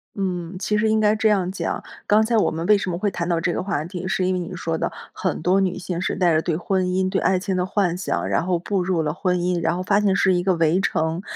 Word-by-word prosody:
嗯， 180 -2 -3
其 210 +3 -1
实 220 +1 +2
应 220 0 +2
该 210 0 +3
这 220 0 +2
样 190 -3 +1
讲， 190 - -3 0.2
刚 215 +1 +4
才 230 +1 0
我 - - +3
们 165 +1 -4
为 210 - +6
什 195 - -3
么 170 - -2
会 205 +2 -1
谈 170 0 -3
到 170 -1 +1
这 170 +1 0
个 - - -2
话 185 -6 -2
题， 180 0 -6
是 190 -1 0
因 185 - +1
为 185 - -1
你 180 +1 -6
说 165 -2 -2
的 - - -2 0.2
很 185 -4 -2
多 185 +3 +3
女 185 -1 0
性 175 -1 -4
是 - - -1
带 175 -3 +3
着 155 - +3
对 165 -1 -1
婚 185 +1 0
姻、 185 +1 +1
对 - - 0
爱 190 - +2
情 190 +1 -2
的 180 0 0
幻 185 -3 0
想， 185 - -2
然 - - +1
后 180 -1 +1
步 190 +3 -1
入 180 -2 0
了 150 -1 -1
婚 180 +1 0
姻， 175 -1 0
然 170 - +1
后 185 - -3
发 200 +2 +2
现 200 -2 +2
是 190 -1 +3
一 175 - +1
个 185 0 +1
围 165 +2 +2
城， 160 -1 -1
185 Hz, 315 characters per minute, -22 LUFS, 175-195 Hz, 0.2 s, 为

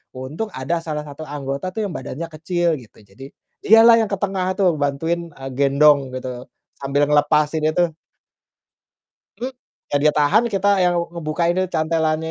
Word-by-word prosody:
untung 145 +12 -5
ada 165 +6 -2
salah 150 -2 -4
satu 145 +2 -10
anggota 140 +3 -4
tuh 220 -1 -2
yang 175 - -7
badannya 135 +5 -5
kecil 170 +2 -1
gitu, 115 - -18
jadi 135 +8 -12 0.3
dialah 225 +2 +7
yang 220 - -1
ke 200 - 0
tengah 190 -2 -1
tuh 185 -4 +3
bantuin, 165 +4 -1
eee, 135 -1 -8
gendong 140 0 +4
gitu, 125 -1 -6 0.3
sambil 140 +1 +1
ngelepasin 150 +1 +2
itu. 170 +1 +1 1.5
Mmm, 255 +2 -4 0.4
iya - - -5
dia 150 0 +4
tahan, 180 +11 +4
kita 200 +1 +1 0.2
yang 175 - +2 0.2
ngebukainnya 170 +3 -1
cantelannya 160 0 0
155 Hz, 150 wpm, -20 LUFS, 140-175 Hz, 1.5 s, dialah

